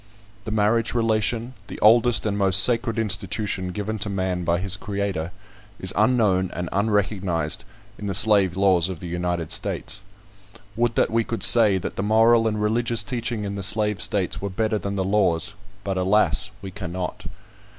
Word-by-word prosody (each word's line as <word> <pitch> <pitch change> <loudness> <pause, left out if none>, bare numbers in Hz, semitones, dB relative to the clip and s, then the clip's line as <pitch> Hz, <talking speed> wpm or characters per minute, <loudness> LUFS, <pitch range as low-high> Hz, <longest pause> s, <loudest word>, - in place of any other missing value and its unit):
The - - -4
marriage 110 +2 +1
relation, 115 +1 0
the - - -8
oldest 115 +2 +4
and 105 -2 -1
most 95 -1 +5
sacred 115 -2 +1
institution 105 -2 -2
given 105 +4 -4
to 105 - -1
man 95 -2 -2
by 85 0 0
his 95 0 -1
Creator, 100 -5 -4 0.5
is 95 - +1
unknown 105 -5 +2
and 90 0 -4
unrecognised 100 -5 0 0.3
in 105 - -5
the 100 - -2
slave 100 -3 +3
laws 95 -3 +3
of 90 -4 -6
the - - -9
United 85 -1 -3
States. - - -3 0.7
Would 120 0 0
that - - +1
we 115 0 +1
could 115 +1 -3
say, 110 -5 +6
that 95 - -6
the - - -1
moral 115 +2 +3
and 105 -1 -2
religious 115 +2 0
teaching 120 -3 -4
in 100 -1 -4
the 100 - -5
slave 105 +1 +1
states 95 -4 -1
were 100 - -3
better 110 +2 -1
than 100 +1 -4
the 95 - -1
laws; 95 0 +1 0.3
but, 95 -1 -3
alas! 95 - +2
we 95 - -7
cannot. 90 -2 -6
100 Hz, 170 wpm, -23 LUFS, 95-110 Hz, 0.7 s, say